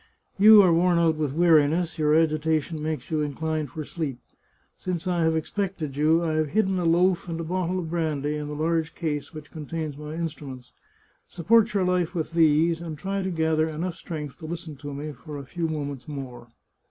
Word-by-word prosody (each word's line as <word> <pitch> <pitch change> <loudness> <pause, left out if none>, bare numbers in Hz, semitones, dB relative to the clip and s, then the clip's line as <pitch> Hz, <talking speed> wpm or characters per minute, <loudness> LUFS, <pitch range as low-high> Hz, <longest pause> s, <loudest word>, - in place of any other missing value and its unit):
" - - -38
You 215 -1 +10
are 175 -3 +4
worn 175 +1 +3
out 165 -2 +3
with 150 -3 -1
weariness, 165 0 +3
your 150 0 +3
agitation 160 0 +1
makes 155 +1 -4
you 155 -1 +1
inclined 155 0 -2
for 155 - -6
sleep. 150 -4 -4 0.6
Since 180 -3 -4
I 175 -2 0
have 160 0 +2
expected 160 -3 -3
you 160 +3 +3
I 160 -2 0
have 155 -1 +1
hidden 190 +2 +1
a 175 - -1
loaf 175 +2 +2
and 165 0 -3
a - - -3
bottle 180 +2 -1
of 165 -3 -4
brandy 150 -3 -1
in 150 -1 -4
the 150 - -5
large 160 +1 -1
case 150 -4 -3
which 155 -2 -10
contains 155 -2 -5
my 150 +1 -6
instruments. 145 -6 -6 0.5
Support 215 +6 +3
your 195 - +3
life 180 -1 0
with 160 -1 -2
these, 165 0 +3
and 160 -3 -6
try 195 +4 -2
to 190 - -2
gather 160 -2 +1
enough 170 +3 -3
strength 150 -4 -7
to 160 - -8
listen 165 -2 -6
to 145 +1 -7
me 145 +2 -5
for 145 +2 -9
a 140 - -7
few 170 +4 -3
moments 145 -4 -5
more. 130 -5 -7
160 Hz, 200 wpm, -25 LUFS, 150-170 Hz, 0.6 s, You